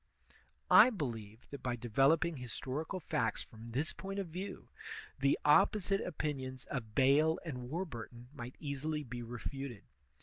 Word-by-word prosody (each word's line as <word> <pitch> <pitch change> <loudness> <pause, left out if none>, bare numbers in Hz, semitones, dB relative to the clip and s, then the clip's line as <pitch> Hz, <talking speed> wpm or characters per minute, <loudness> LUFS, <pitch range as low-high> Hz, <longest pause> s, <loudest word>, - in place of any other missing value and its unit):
I - - +10
believe 115 - -5
that 140 - -7
by 125 -1 -1
developing 135 +8 +3
historical 135 - -4
facts 115 -9 -1
from 115 +1 -11
this 140 +7 0
point 195 +1 -6
of 195 -4 -2
view, 185 +5 -6 0.5
the 140 +1 +3
opposite 195 +5 +5
opinions 135 -6 -3
of 115 -7 -4
Bayle 145 +4 +5
and 125 -6 -5
War 170 +6 -1
burton 120 - -9
xnight 125 -1 -7
easily 150 +1 -2
be 120 -2 -6
refuted. 120 0 -5
135 Hz, 140 wpm, -35 LUFS, 120-160 Hz, 0.5 s, I